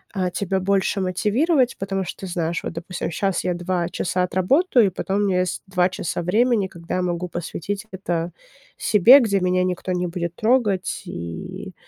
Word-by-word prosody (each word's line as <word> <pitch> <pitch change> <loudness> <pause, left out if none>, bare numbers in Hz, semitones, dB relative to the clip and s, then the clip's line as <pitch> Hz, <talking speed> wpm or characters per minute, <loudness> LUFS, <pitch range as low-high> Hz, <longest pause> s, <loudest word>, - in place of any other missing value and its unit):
э, 185 -2 0
тебя 195 -1 -1
больше 195 +1 +1
мотивировать, 240 - +1
потому 195 0 -2
что 190 - -7
ты - - -5
знаешь: 170 -1 -2
"Вот, - - -4
допустим, 175 +2 -4
щас 190 +2 -1
я 180 - 0
2 175 0 -1
часа 180 +1 -1
отработаю, 230 - +3
и - - +1
потом 190 +2 -2
у - - +1
меня 185 -2 +2
есть 180 -1 -1
2 180 -1 +2
часа 175 -2 -3
времени, 215 +3 +2
когда 170 -2 -6
я 185 - 0
могу 180 0 -2
посвятить 175 +4 -4
это 175 -3 -2 0.5
себе. 215 +6 +7
Где 205 -6 +1
меня 180 0 +1
никто 185 0 -2
не 180 0 0
будет 170 0 -4
трогать, 220 -5 +1
и, 85 -1 -7
185 Hz, 180 wpm, -22 LUFS, 175-200 Hz, 0.5 s, себе